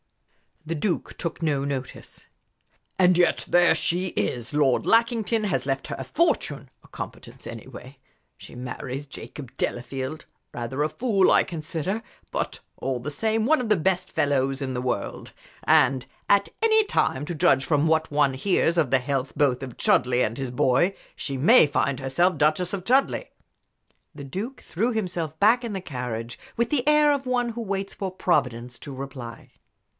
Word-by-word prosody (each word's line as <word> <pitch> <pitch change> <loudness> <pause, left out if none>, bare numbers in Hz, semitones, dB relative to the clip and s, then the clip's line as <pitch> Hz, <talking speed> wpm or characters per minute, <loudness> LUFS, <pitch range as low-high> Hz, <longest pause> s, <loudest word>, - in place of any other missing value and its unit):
The 165 - -2
Duke 170 +4 -2
took 170 0 -4
no 145 -3 +1
notice. 135 -2 -6 0.7
"And 180 -1 +5
yet 175 -1 +2
there 175 -1 +5
she 180 +2 0
is! 115 - -3
Lord 145 -4 +2
Lackington 230 -1 +2
has 190 -8 -1
left 135 0 -2
her - - -4
a - - -4
fortune 145 - 0
a - - -18
competence, - - -9
anyway. 130 +2 -10 0.4
She - - -12
marries 125 +2 -5
Jacob 135 -1 -9
Delafield 130 +4 -3 0.3
rather 120 +4 -4
a 155 - 0
fool, 205 0 +2
I - - +5
consider, 170 +5 -4 0.3
but - - -3 0.2
all 130 -2 -2
the 130 +5 -5
same 220 +6 0
one 315 +5 +4
of 235 - -4
the 210 - +5
best 185 +2 0
fellows 135 -1 +1
in 130 -1 -2
the 125 - -2
world. 125 - -3 0.3
And 130 -3 +4 0.2
at 200 0 +4
any 440 -1 +5
time, 145 - 0
to 170 - -4
judge 145 -5 +3
from 150 0 +2
what 160 -1 +1
one 145 -2 +3
hears 170 +2 +1
of 155 -7 +2
the 135 - +4
health 135 +1 -2
both 135 -3 +2
of 130 -3 -8
Chudleigh 125 0 +3
and 115 +3 -4
his 135 -2 -3
boy, 130 +10 +2 0.2
she 135 -2 -4
may 170 - +7
find 140 -1 0
herself 150 +6 +1
Duchess 155 +5 +1
of 190 -2 -4
Chudleigh." 270 - +2 0.9
The 140 - -8
Duke 205 - -5
threw 225 +8 -1
himself 175 -8 -3
back 230 +5 +5
in 230 -3 -4
the 190 - -3
carriage 125 -6 -5 0.2
with 235 0 +1
the 280 -2 0
air 300 -1 +5
of 275 -1 -3
one 245 -1 +1
who 235 +1 -5
waits 195 -2 -3
for 190 -2 -4
Providence 125 -10 -1
to 140 - -8
reply. 130 -3 -8
155 Hz, 170 wpm, -25 LUFS, 135-200 Hz, 0.9 s, may